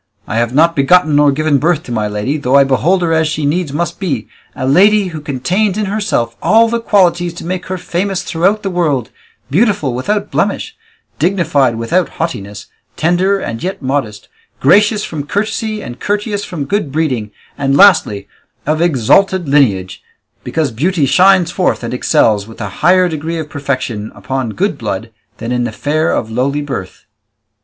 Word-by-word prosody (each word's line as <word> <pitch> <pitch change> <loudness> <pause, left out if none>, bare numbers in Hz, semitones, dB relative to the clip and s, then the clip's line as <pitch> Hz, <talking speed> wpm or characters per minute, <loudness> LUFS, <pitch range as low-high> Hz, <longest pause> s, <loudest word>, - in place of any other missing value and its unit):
I 110 - -3
have 120 0 +1
not 165 +3 +4
begotten 155 +2 +3
nor 145 -1 +5
given 145 0 +1
birth 160 +1 +1
to - - -9
my 110 -2 -1
lady, 105 +7 -2
though 140 -3 0
I 140 - +7
behold 165 +8 +1
her 165 -1 +1
as 160 0 +2
she 155 -1 -2
needs 155 +1 -1
must 170 +3 -3
be, 140 - -2 0.3
a 130 - -3
lady 195 +7 +4
who 160 -3 -7
contains 180 +9 -1
in 215 - 0
herself 195 - -1
all 225 +1 +4
the 235 +1 -1
qualities 175 -6 +2
to 170 - -8
make 180 +1 -4
her 185 - -3
famous 185 +2 -2
throughout 190 +5 0
the 195 - -2
world, 150 - -1 0.4
beautiful 190 - +1
without 205 +12 -2
blemish, 445 - -1 0.4
dignified 160 -8 +1
without 115 +11 0
haughtiness, 105 -11 -4 0.3
tender 180 +4 +2
and 115 -10 -5
yet 185 -4 -4
modest, 130 -6 -3 0.3
gracious 210 +1 +4
from 145 -3 -5
courtesy 215 +3 -2
and 120 +1 -8
courteous 205 0 -2
from 155 -6 -5
good 195 -4 -2
breeding, 130 -8 -1 0.3
and 140 -1 0
lastly, 160 - +4 0.4
of 155 +2 0
exalted 175 - +2
lineage, 110 -11 +1 0.4
because 155 -5 -1
beauty 155 +6 0
shines 185 +3 +4
forth 180 -8 0
and 115 - -4
excels 105 -4 +2
with 115 - -13
a 100 -3 -4
higher 180 +2 +4
degree 160 0 -4
of 155 -2 -6
perfection 130 -7 -3
upon 115 +5 -3
good 190 -5 -1
blood 110 +1 -4 0.3
than 115 +1 -5
in 125 0 0
the 120 - -2
fair 155 +7 -1
of 110 - -2
lowly 140 +5 -1
birth." 135 -10 -6
155 Hz, 175 wpm, -15 LUFS, 130-185 Hz, 0.4 s, I